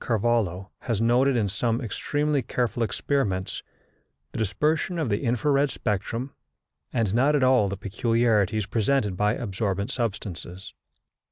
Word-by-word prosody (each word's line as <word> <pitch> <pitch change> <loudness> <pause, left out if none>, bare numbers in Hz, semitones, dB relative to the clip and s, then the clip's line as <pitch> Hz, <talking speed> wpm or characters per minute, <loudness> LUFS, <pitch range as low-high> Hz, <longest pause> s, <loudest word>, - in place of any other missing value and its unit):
Carvallo 110 -5 0
has 115 -4 -2
noted 125 +4 +3
in 105 -3 +1
some 115 +4 0
extremely 145 +4 -1
careful 120 0 -2
experiments, 105 -3 -1 0.7
the - - -5
dispersion 150 - 0
of 155 -7 -1
the 100 - +1
infra 125 +2 0
red 140 +1 +3
spectrum, 115 +4 -3 0.6
and 115 -5 0
not 135 +6 +3
at 140 - +2
all 130 -6 +4
the 100 - -4
peculiarities 110 0 +1
presented 105 0 +1
by 105 +3 +1
absorbent 100 0 -2
substances. 95 -6 -4
115 Hz, 135 wpm, -26 LUFS, 100-130 Hz, 0.7 s, all